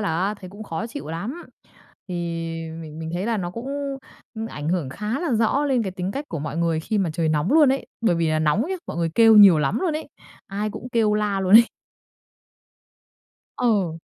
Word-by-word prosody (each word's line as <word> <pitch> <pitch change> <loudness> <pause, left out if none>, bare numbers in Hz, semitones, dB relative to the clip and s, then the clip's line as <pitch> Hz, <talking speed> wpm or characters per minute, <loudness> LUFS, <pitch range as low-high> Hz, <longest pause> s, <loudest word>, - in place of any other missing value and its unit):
là 205 - -1 0.2
á 205 - -2
thấy 185 -3 -11
cũng 205 +3 -10
khó 200 +1 -4
chịu 275 +5 -8
lắm. 170 - -4 0.7
Thì 180 - -4 0.7
mình 155 -1 -9
mình 160 0 -5
thấy 180 +4 -2
là 230 -1 0
nó 175 -4 -3
cũng, 230 +7 -7 0.7
ừm, 225 0 -4
ảnh 150 -8 -5
hưởng 170 -5 0
khá 215 - -3
là 335 -7 -1
rõ 230 +6 +2
lên 265 -4 +1
cái 190 -3 -4
tính 185 +1 -3
cách 280 +5 -4
của 165 - -4
mọi 150 +1 -5
người 165 -1 +1
khi 210 +6 -2
mà 185 -4 0
trời 160 0 0
nóng 155 - +1
luôn 305 -2 +6
ấy, 270 - -3
bởi 225 -7 +2
vì 165 -1 +1
là 155 0 +1
nóng 155 +7 +2
ấy, 375 +8 -3
mọi - - -6
người 165 -1 0
kêu 225 -1 +7
nhiều 195 -6 +9
lắm 140 -2 0
luôn 360 -4 0
ấy, 310 - -7 0.4
ai 205 +2 -3
cũng 250 - -8
kêu 220 -2 +2
la 210 -2 0
luôn 190 0 0
ấy. 230 +1 +8 1.9
Ừ. 195 -9 +1
200 Hz, 220 wpm, -23 LUFS, 165-230 Hz, 1.9 s, nhiều